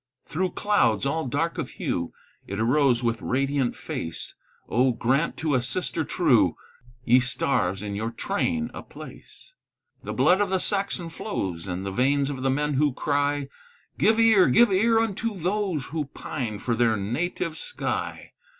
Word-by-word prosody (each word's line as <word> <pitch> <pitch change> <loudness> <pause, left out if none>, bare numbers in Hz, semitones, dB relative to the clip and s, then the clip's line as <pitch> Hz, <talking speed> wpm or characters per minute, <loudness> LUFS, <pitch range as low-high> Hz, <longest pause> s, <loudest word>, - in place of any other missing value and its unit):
Through 180 +3 -2
clouds, 140 - +2
all 150 +1 -1
dark 165 +6 -1
of 140 - -3
hue, 85 -1 -2 0.4
It 100 +2 -4
arose 125 +1 +3
with 115 -1 0
radiant 135 -1 0
face; 80 0 -5 0.3
Oh, 125 +2 +2
grant 135 +7 0
to 155 -2 -1
a 130 - +3
sister 160 +5 -1
true, - - +3 0.5
Ye 125 +2 +6
stars, 125 -6 0
in 105 -1 -4
your 110 +3 -2
train 235 - -2
a - - -7
place! - - -13 0.5
The - - -6
blood 185 +3 +3
of 205 - +1
the 190 - +2
Saxon 195 -3 -1
flows 95 - -4
In 90 +1 -3
the 100 - -3
veins 140 +5 +1
of 135 -2 -6
the 135 - +1
men 150 +2 0
who 145 0 +2
cry, 145 -1 0 0.5
"Give 220 +1 +4
ear, 225 -4 +6
give 235 -3 +5
ear 225 +4 +3
unto 225 0 -1
those 185 -4 -1
Who 155 -2 -1
pine 120 -5 -5
for 120 +3 -2
their 115 -1 +2
native 155 - -2
sky! 485 - -4
140 Hz, 160 wpm, -25 LUFS, 120-185 Hz, 0.5 s, Ye